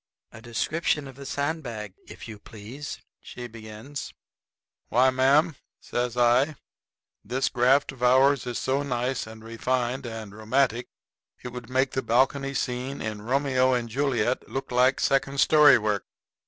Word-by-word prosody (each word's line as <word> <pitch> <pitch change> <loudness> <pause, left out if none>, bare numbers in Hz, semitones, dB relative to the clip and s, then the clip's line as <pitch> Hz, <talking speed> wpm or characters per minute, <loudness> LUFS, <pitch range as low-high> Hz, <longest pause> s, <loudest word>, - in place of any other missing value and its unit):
"A 110 - -12
description 145 +5 -1
of 135 - -11
the 140 0 -9
sandbag, 135 - -3
if - - -10
you 110 -2 -9
please," 115 +8 -8 0.2
she 125 - -9
begins. 115 +4 -8 0.8
"Why, 130 +3 +4
ma'am," 140 +4 +3 0.2
says 120 0 -3
I, 125 +5 +3 0.7
"this 130 +5 -1
graft 130 +3 +3
of 130 - -15
ours 130 +1 +4
is 120 - -3
so 135 +2 0
nice 125 -3 -2
and 110 0 -11
refined 125 +2 -2
and 110 -3 -7
romantic, 120 +2 0 0.6
it 125 - -5
would 125 0 -9
make 130 +1 +1
the 130 - -1
balcony 135 +3 +1
scene 130 +1 -3
in 110 -1 -4
'Romeo 130 +1 +2
and 120 -1 -2
Juliet' 130 0 0
look 135 -1 -5
like 125 +2 +3
second 135 0 +1
story 150 +1 +7
work." 105 -3 -1
125 Hz, 145 wpm, -26 LUFS, 115-135 Hz, 0.8 s, story